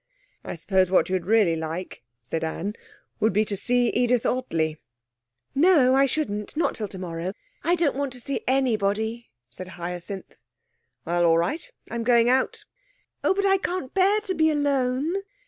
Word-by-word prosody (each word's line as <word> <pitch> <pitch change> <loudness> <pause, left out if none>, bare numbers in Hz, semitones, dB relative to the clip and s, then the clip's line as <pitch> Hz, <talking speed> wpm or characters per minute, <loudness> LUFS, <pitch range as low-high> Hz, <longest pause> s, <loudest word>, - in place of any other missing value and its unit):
'I - - -5
suppose 185 +2 +1
what 185 - +3
you'd 185 -2 -1
really 210 -6 +4
like,' 160 +3 -5 0.2
said 160 +7 -3
Anne, 165 +5 -3 0.5
'would 220 -2 +2
be 210 +3 +3
to 205 - -2
see 245 +4 +2
Edith 245 -1 +1
Ottley.' 165 -12 0 0.8
'No, 280 -4 +5
I 275 +1 +5
shouldn't. 230 -5 -2
Not 335 - +1
till 215 - -4
tomorrow. 180 -1 -5 0.3
I 345 +3 +3
don't 330 -6 +1
want 280 -1 -2
to 250 - -7
see 275 +4 -3
anybody,' 225 -3 0 0.2
said 180 +10 -8
Hyacinth. 180 +2 -6 0.7
'Well, 175 +1 +1
all 165 -1 +5
right. 300 - -1 0.2
I'm 235 - -2
going 235 0 +4
out.' 260 +1 +1 0.6
'Oh, - - +3
but 400 0 0
I 390 0 +4
can't 360 -8 -3
bear 390 +2 +4
to 400 -3 -3
be 315 -2 +3
alone.' 285 +2 0
230 Hz, 165 wpm, -25 LUFS, 185-280 Hz, 0.8 s, No